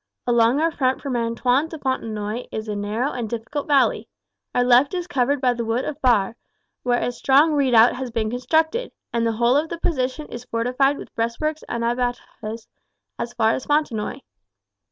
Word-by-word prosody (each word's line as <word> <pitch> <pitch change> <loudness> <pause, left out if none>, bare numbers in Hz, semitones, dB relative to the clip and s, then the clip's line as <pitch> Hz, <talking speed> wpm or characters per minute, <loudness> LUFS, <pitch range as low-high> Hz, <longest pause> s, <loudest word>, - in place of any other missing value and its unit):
Along 235 +2 +3
our 330 +1 +2
front 260 -4 0
from 275 -3 -3
Antoin 245 +5 +1
to 320 - -7
Fontenoy 225 -4 -3
is 220 0 -5
a 210 - -3
narrow 215 +7 -1
and 240 -3 -4
difficult 235 +6 -4
valley. 280 -3 +2 0.5
Our 245 - +4
left 250 +6 +4
is 355 -1 -2
covered 285 -4 +1
by 255 -2 +2
the 235 -1 -3
wood 230 +3 -1
of 300 0 -5
Barre, 230 -5 +3 0.5
where 245 -1 +1
a - - -1
strong 275 +6 +4
redoubt 250 -5 +5
has 260 -1 -4
been 225 -2 -2
constructed; 320 - 0 0.2
and 230 -1 +1
the 225 - 0
whole 235 +3 +2
of 305 +3 +1
the 340 - -4
position 290 -3 -1
is 240 0 -7
fortified 255 +5 +1
with - - -10
breastworks 295 +7 -2
and 235 -1 -2
abattis 235 -2 -3 0.5
as 240 - -4
far 225 -1 +3
as 255 - -3
Fontenoy. 290 -8 0
245 Hz, 180 wpm, -22 LUFS, 230-285 Hz, 0.5 s, redoubt